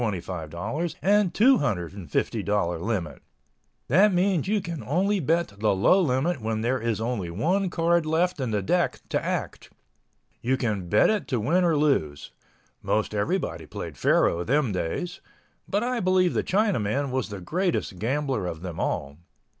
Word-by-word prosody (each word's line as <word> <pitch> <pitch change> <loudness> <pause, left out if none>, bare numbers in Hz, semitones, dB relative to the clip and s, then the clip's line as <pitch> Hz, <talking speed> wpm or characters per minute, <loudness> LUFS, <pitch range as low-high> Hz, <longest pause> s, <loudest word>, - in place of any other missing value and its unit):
00 120 - +1 2.7
limit—that 115 - -1
means 180 -2 +1
you 210 +1 +2
can 170 -5 -6
only 190 +8 +1
bet 165 +2 +1
the 105 -2 +2
low 180 - +4
limit 140 0 0
where 110 0 -1
there 125 +4 0
is 115 -2 -1
only 110 -6 -2
one 180 - 0
card 170 0 +2
left 165 +2 +1
in 130 -3 -1
the 105 -3 -1
deck - - 0
to - - -1
act. - - -4 0.7
You 130 +2 +1
can 105 -8 -2
bet 105 - +4
it 215 -2 -2
to 125 -4 -1
win 165 - +2
or 165 -3 +3
lose. 80 - 0 0.5
Most 110 0 0
everybody 100 - -2
played - - -7
faro 85 +1 +2
them 135 +2 +1
days—but 175 - -5
I 250 0 -1
believe 185 -2 +2
the - - 0
Chinaman 145 - 0
was 130 -3 -2
the 100 -2 -6
greatest 165 - -2
gambler 130 -3 -1
of 80 -1 -6
them 90 -3 -6
all. 70 +2 -2
135 Hz, 145 wpm, -26 LUFS, -, 2.7 s, low